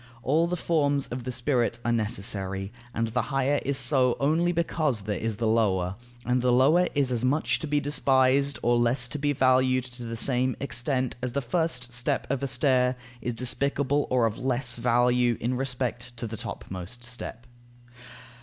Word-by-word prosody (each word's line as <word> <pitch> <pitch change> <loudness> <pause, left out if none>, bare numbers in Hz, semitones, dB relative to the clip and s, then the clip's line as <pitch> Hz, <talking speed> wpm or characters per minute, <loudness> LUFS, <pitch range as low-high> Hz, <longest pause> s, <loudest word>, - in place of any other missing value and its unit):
All 155 +7 +2
the 180 +1 -2
forms 145 -4 +1
of 125 0 -5
the 130 - -2
spirit 125 -2 0
are 120 - +2
necessary, 100 -3 -2 0.2
and 115 -1 -1
the 120 +3 0
higher 135 +1 0
is 140 -1 -1
so 130 -3 +3
only 160 +5 +2
because 160 -8 0
there 100 +1 -3
is 115 -1 -2
the 115 +3 -2
lower, 100 -5 +1 0.3
and 125 +1 +1
the 125 0 +2
lower 150 +9 +4
is 140 -3 +1
as 120 -1 -1
much 125 -3 +1
to 155 - -5
be 145 0 +1
despised 140 -1 +2
or 120 0 +3
less 120 +1 +2
to 145 - -4
be 145 +1 +1
valued 130 -1 +3
to 125 -1 -9
the 115 0 -5
same 130 +1 +1
extent 130 0 0
as 125 -1 -3
the 140 - +1
first 125 -3 -1
step 130 +3 -1
of 135 -1 -1
a 140 - -1
stair 130 -1 +2 0.3
is 120 0 -3
despicable, 140 +3 0
or 125 -2 +3
of 115 -1 -2
less 125 -1 -1
value 120 0 +2
in 125 +2 -1
respect 125 -2 -3
to 115 - -4
the 110 0 -5
topmost 95 +3 -6
step. 125 -1 -8
125 Hz, 180 wpm, -27 LUFS, 120-140 Hz, 0.3 s, lower